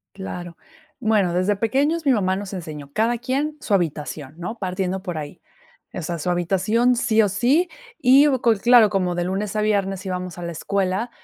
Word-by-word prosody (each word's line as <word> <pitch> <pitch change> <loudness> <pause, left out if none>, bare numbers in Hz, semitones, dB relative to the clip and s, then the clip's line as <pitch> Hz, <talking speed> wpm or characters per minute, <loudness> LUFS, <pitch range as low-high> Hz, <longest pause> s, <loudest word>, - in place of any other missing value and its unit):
Claro. 175 -3 -7 0.4
Bueno, 215 -7 +2
desde 185 +4 +1
pequeños 280 +10 0
mi 275 - +4
mamá 190 -6 +1
nos 200 0 -6
enseñó. 155 -6 -7
Cada 230 +2 +1
quien 275 +5 -2
su 215 - -3
habitación, 150 -5 -2
¿no?, 200 +7 -5
partiendo 185 -1 -2
por 180 -4 -5
ahí. 145 -1 -7 0.5
Esa 175 -1 -4
es 165 - -6
su 180 - -2
habitación 195 +8 +2
sí 225 -2 +2
o 210 - +3
sí. 265 - +2 0.3
Y 275 0 +6
hubo 260 -4 +1
co 235 - +4
l 210 -3 -1
claro, 235 -2 +6
como 185 -3 0
de 175 - -1
lunes 195 +3 -3
a 215 - +1
viernes 195 -2 0
íbamos 180 -1 -4
a - - -7
la 170 - -4
escuela, 195 +6 -1
195 Hz, 200 wpm, -22 LUFS, 180-235 Hz, 0.5 s, Y